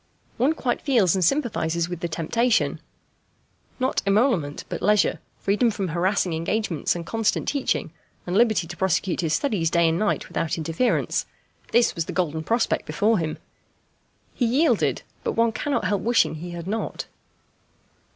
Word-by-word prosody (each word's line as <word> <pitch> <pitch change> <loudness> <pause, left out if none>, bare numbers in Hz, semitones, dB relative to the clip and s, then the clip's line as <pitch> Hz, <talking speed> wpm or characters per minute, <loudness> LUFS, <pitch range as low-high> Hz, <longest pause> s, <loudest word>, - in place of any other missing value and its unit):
One 265 +7 +3
quite 255 -6 -2
feels 230 - +3
and 190 - +1
sympathizes 170 - +1
with 175 -1 -5
the 170 - -2
temptation. 215 +9 0 1.0
Not 260 +1 0
emolument, 195 - +1
but - - -5
leisure; 210 +2 +3 0.2
freedom 210 +5 +2
from 195 -4 -3
harassing 180 +1 0
engagements 165 0 -1
and 170 -1 -5
constant 225 +1 0
teaching, 280 -3 -1 0.3
and 180 - -2
liberty 220 -6 +3
to 170 +1 -8
prosecute 185 0 0
his 165 -2 +1
studies 190 - 0
day 170 0 +3
and 165 +1 +1
night 215 - 0
without 165 - -2
interference: 165 +9 0 0.4
this 240 0 +4
was 165 -4 -2
the - - -6
golden 160 -3 -1
prospect 230 +6 0
before 220 0 +2
him. 160 -2 -3 1.0
He 245 - 0
yielded, 280 +8 +2 0.2
but - - -1
one 230 0 +2
cannot 285 +5 -1
help 205 -2 0
wishing 235 -5 +2
he 165 +3 -7
had 170 -1 -6
not. 215 +4 -3
195 Hz, 155 wpm, -24 LUFS, 165-230 Hz, 1.0 s, this